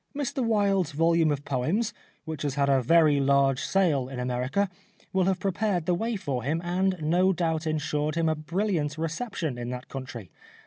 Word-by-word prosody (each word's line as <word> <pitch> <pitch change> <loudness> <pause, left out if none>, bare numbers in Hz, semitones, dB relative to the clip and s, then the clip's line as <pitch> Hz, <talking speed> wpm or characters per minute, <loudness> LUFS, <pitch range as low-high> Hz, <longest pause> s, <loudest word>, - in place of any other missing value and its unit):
Mr 280 -2 -2
Wilde's 200 -7 +1
volume 165 +1 +3
of 145 0 -3
poems, 155 - 0 0.3
which 160 -2 -5
has 145 -2 -2
had 140 -1 +2
a 135 -1 +4
very 155 +2 +4
large 135 -1 +3
sale 150 -9 +1
in 130 -2 -6
America, 125 +10 0 0.5
will 190 -1 +2
have 190 -1 +1
prepared 195 -2 0
the 180 - +2
way 225 +6 -1
for 140 -10 -3
him 150 +7 -1
and 185 +1 0
no 175 +5 +3
doubt 165 -3 -1
insured 150 0 -1
him 165 -1 +1
a 160 - +3
brilliant 155 -1 -1
reception 165 - -3
in 120 0 -4
that 125 0 -6
country. 120 - -7
160 Hz, 180 wpm, -27 LUFS, 140-185 Hz, 0.5 s, a